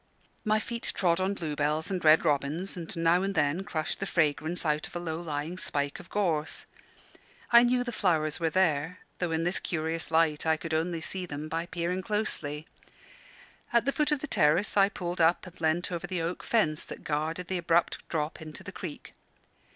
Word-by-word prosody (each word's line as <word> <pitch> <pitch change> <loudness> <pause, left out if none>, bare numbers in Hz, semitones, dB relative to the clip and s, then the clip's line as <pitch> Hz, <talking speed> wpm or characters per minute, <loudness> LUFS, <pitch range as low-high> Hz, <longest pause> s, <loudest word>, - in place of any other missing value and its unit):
My 215 -1 +3
feet 235 +2 -3
trod 170 -2 +2
on 195 +2 0
bluebells 155 +1 -1
and 185 -2 -2
red 155 +2 +6
robins, 150 +5 0
and 170 -2 -6
now 165 +2 +3
and 195 +1 -1
then 150 +4 +1
crushed 155 -5 -3
the 195 - -2
fragrance 165 +1 +1
out 150 0 +1
of - - -16
a - - -1
low 165 -2 -3
lying 160 +2 -4
spike 145 -4 -2
of - - -13
gorse. 160 -7 -1 0.9
I 235 0 +9
knew 245 +1 +3
the 245 - -4
flowers 160 -8 +1
were 165 -1 +1
there, 160 -1 +1 0.2
though 175 - 0
in 160 0 0
this 175 +2 +1
curious 160 -1 -2
light 160 -2 +2
I 160 -1 +2
could 165 +1 -5
only 165 +1 0
see 180 +2 -3
them 150 0 -5
by 165 +2 -3
peering 180 +1 -2
closely. 170 -8 -2 1.1
At 235 0 +3
the 275 - +2
foot 300 +1 +1
of 295 -3 +1
the 305 - -4
terrace 165 - +3
I 200 -1 +5
pulled 175 -3 -3
up 165 +2 +3
and 180 -2 -13
leant 160 +3 +1
over 175 0 -3
the 180 -2 -2
oak 170 +2 -3
fence 155 -10 +1
that - - -9
guarded 160 +4 -2
the 185 0 -1
abrupt 170 0 +2
drop 155 0 -2
into 155 -1 -8
the - - -7
creek. - - -8
170 Hz, 195 wpm, -29 LUFS, 155-185 Hz, 1.1 s, I